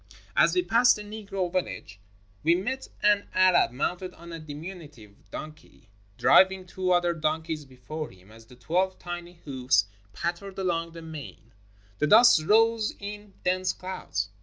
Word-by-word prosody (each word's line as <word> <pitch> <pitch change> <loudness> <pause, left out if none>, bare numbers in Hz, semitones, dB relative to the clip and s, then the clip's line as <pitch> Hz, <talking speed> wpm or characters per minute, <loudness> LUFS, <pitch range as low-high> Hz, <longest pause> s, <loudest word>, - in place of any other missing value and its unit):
As - - +4
we 360 - +3
passed 245 -4 +5
the 210 - -7
Negro 200 -4 -4
village 175 - -3 0.4
we 165 +3 +4
met 260 +9 -3 0.2
an 205 -1 +3
Arab 185 -1 +5
mounted 175 +9 -3
on 170 0 -12
a 165 - -6
diminutive 150 - -9 0.2
donkey, 155 -7 -10 0.3
driving 190 0 +5
two 185 0 -2
other 175 -1 +3
donkeys 160 -1 -2
before 135 +4 -7
him. 95 +2 -18
As 115 0 -16
the 125 - -15
twelve 180 +9 0
tiny 175 0 -7
hoofs 130 -7 +2 0.3
pat 170 - -2
tered 195 +1 -11
along 170 -3 -1
the 165 -1 -9
mane, 145 -7 -10 0.5
the 150 - +2
dust 225 -3 +7
rose 225 +3 +3
in 205 0 -8
dense 185 0 +1
clouds. 105 - -4
175 Hz, 155 wpm, -27 LUFS, 150-190 Hz, 0.5 s, dust